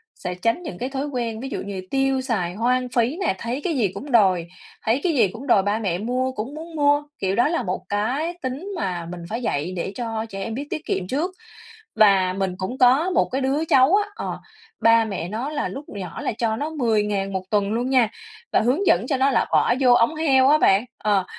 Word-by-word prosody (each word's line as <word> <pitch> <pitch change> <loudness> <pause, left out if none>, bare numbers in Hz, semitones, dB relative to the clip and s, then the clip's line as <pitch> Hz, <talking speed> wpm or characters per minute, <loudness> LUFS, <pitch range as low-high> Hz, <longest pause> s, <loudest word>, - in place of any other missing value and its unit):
sẽ 180 -1 -5
tránh 230 - +1
những 315 - -6
cái 255 +2 -3
thói 275 +1 -3
quen, 235 -5 -3
ví 265 +2 -5
dụ - - -4
như 195 -2 -5
tiêu 270 -1 +1
xài 195 -9 -2
hoang 250 +3 +1
phí 245 +6 0
nè, 190 - +1
thấy 240 +6 -4
cái 340 - 0
gì 215 -5 +3
cũng 280 0 -7
đòi, 185 -7 +4 0.4
thấy 230 +5 +2
cái 350 - +1
gì 230 -8 +4
cũng 230 +9 -9
đòi 200 -6 +4
ba 205 +2 0
mẹ 190 -6 -1
mua, 250 +5 -1
cũng 260 +5 -6
muốn 325 +1 -9
mua. 290 -1 +3 0.2
Kiểu 190 0 0
đó 240 +5 +3
là 335 +2 -1
một 185 0 -3
cái 255 +12 -1
tính 270 +9 -4
mà 180 - -3
mình 175 -1 -7
phải 230 +3 -3
dạy 165 - -2
để 180 +2 -3
cho 225 -2 -3
trẻ 195 -1 -5
em 225 - -4
biết 285 +4 -5
tiết 310 - -5
kiệm 180 - -2
trước. 310 - -1 0.6
Và 195 -4 +4
mình 190 -1 -2
cũng 195 +7 -4
có 265 +8 +4
một 365 - +1
cái 265 - -1
đứa 275 +4 0
cháu 270 +6 +5
á 415 0 +1
ờ, - - -5 0.4
ba 230 0 +5
mẹ 190 -5 -4
nó 230 +8 -3
là 295 -1 -2
lúc 280 +2 -7
nhỏ 185 -5 -7
là - - -1
cho 225 -2 0
nó 295 +6 -3
10.000 210 -8 0
1 190 -1 -2
tuần 205 -1 +1
luôn 245 +3 -1
nha, 250 -5 +4 0.4
và - - +4
hướng 270 - +1
dẫn 185 +7 +4
cho 270 - 0
nó 270 +1 +3
là 240 - +2
bỏ - - +4
vô 250 -3 +5
ống 240 +6 +3
heo 270 -4 +4
á 300 - +6
bạn. 200 -5 +4
Ờ, 200 -3 +1
240 Hz, 240 wpm, -23 LUFS, 200-275 Hz, 0.6 s, á